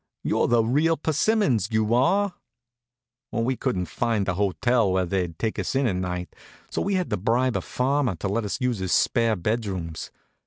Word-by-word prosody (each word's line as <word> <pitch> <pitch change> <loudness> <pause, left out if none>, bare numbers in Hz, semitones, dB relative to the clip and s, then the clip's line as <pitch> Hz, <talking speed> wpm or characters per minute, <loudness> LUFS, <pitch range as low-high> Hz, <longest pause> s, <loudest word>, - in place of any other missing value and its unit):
You're - - +1
the 120 -1 +3
real 150 +8 +2
persimmons, 155 - +1
you 110 0 +1
are." 190 +11 +2 1.0
We 120 +3 0
couldn't 95 -9 -1
find 105 +4 -1
a 90 - +1
hotel 100 +4 +1
where 95 0 +1
they'd 90 -3 -2
take 110 +3 -2
us - - -2
in 135 0 +2
that 115 - +1
night, 90 -1 -4 0.4
so - - -1
we 200 0 0
had 185 -2 -1
to - - +1
bribe 120 +6 +1
a - - 0
farmer 130 -4 0
to 90 - -4
let 105 +4 -1
us 105 +6 -3
use 125 -5 0
his 95 -1 -1
spare 115 -3 +2
bed 105 +6 -1
rooms. 85 -5 -5
115 Hz, 190 wpm, -25 LUFS, 95-130 Hz, 1.0 s, the